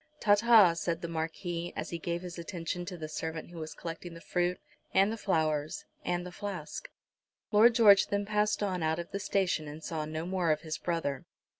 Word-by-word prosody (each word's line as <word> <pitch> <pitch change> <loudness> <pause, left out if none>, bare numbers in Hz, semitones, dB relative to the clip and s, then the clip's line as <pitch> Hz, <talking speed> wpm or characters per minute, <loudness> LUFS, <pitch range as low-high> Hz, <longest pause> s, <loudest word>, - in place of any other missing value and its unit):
"Ta, 205 - +5
ta," 210 -4 +7
said 170 0 -2
the - - -1
Marquis, 170 +1 -3
as 155 - -4
he 170 - -3
gave 170 +2 -3
his 180 -1 -7
attention 170 +1 -4
to 180 -1 -6
the 155 -2 -5
servant 160 +2 -5
who 170 - -8
was 155 0 -6
collecting 165 +1 -7
the - - -9
fruit, 175 +1 -1 0.4
and 195 +2 +5
the - - -2
flowers, 155 -7 0 0.2
and 175 0 -1
the 180 - -7
flask. 200 - -6 0.6
Lord 225 +2 +6
George 205 -4 +7
then 205 0 -1
passed 210 0 +1
on 185 -3 -1
out 160 0 +1
of 170 0 -6
the 200 - -3
station, 190 -6 0
and 150 +2 -8
saw 155 -2 -3
no 155 +1 -4
more 180 -2 0
of 155 0 +2
his 155 -1 -4
brother. 165 -6 -2
175 Hz, 205 wpm, -31 LUFS, 160-195 Hz, 0.6 s, ta